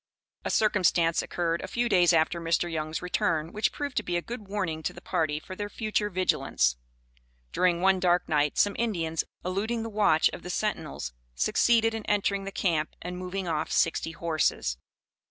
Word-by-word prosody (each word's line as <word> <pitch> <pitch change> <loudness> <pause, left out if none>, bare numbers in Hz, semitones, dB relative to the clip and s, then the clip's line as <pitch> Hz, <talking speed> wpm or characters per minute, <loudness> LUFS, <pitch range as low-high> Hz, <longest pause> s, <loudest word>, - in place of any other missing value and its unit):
A - - -2
circumstance 180 -6 +3
occurred 170 -1 -1
a - - -5
few 240 0 0
days 180 -5 +5
after 165 +1 +2
Mr. 165 +1 0
Young's 155 +1 -3
return, 165 -2 0
which 215 +1 +1
proved 285 -2 -4
to - - +3
be 175 -1 -1
a - - -1
good 230 -4 -7
warning 185 -6 -2
to - - -3
the - - -10
party 150 -2 -1
for 185 - -9
their 205 +1 -4
future 215 -1 -1
vigilance. 175 - +1 0.8
During 175 -2 +2
one 190 0 +4
dark 175 -1 +2
night, 150 -2 +1
some 205 -1 +3
Indians, 170 -9 0 0.2
eluding 215 +5 -1
the 225 - -4
watch 205 -7 +4
of - - -7
the 180 - -8
sentinels, 165 - -3 0.2
succeeded 225 - +3
in 225 -1 -4
entering 200 -1 +1
the 195 - -5
camp 160 -6 0
and 180 +1 -5
moving 185 +1 -4
off 160 -2 -1
sixty 165 0 +1
horses. 155 - 0
180 Hz, 180 wpm, -28 LUFS, 165-205 Hz, 0.8 s, days